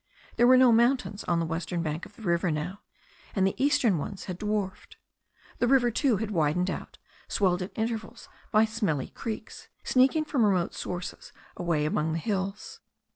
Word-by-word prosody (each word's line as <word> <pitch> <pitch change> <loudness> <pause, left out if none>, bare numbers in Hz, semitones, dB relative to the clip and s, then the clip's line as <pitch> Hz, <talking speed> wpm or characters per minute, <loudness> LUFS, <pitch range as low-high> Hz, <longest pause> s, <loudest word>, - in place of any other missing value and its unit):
There 240 +1 +5
were 255 0 +7
no 255 -1 +7
mountains 235 -2 +2
on 170 -1 +1
the 165 - 0
western 170 +1 -3
bank 155 +1 -3
of - - -23
the 230 - -13
river 170 -1 +1
now, 160 +6 -3 0.5
and 190 -2 +3
the 190 - +1
eastern 235 - +3
ones 190 +6 -6
had 180 -1 -6
dwarfed. 210 -2 -3 0.6
The 245 - +2
river, 245 -2 +4
too, 240 -1 +2
had 215 +1 -3
widened 175 +1 +1
out, - - -7 0.3
swelled 185 -3 +1
at 180 - -5
intervals 225 0 -4 0.2
by 215 +1 +5
smelly 205 - -1
creeks, 225 -2 -7 0.2
sneaking 270 +5 +3
from 275 -6 +1
remote 185 -5 +2
sources 175 0 -6 0.2
away 170 -4 0
among 155 +1 0
the - - -1
hills. 195 +2 -3
195 Hz, 175 wpm, -28 LUFS, 170-230 Hz, 0.6 s, were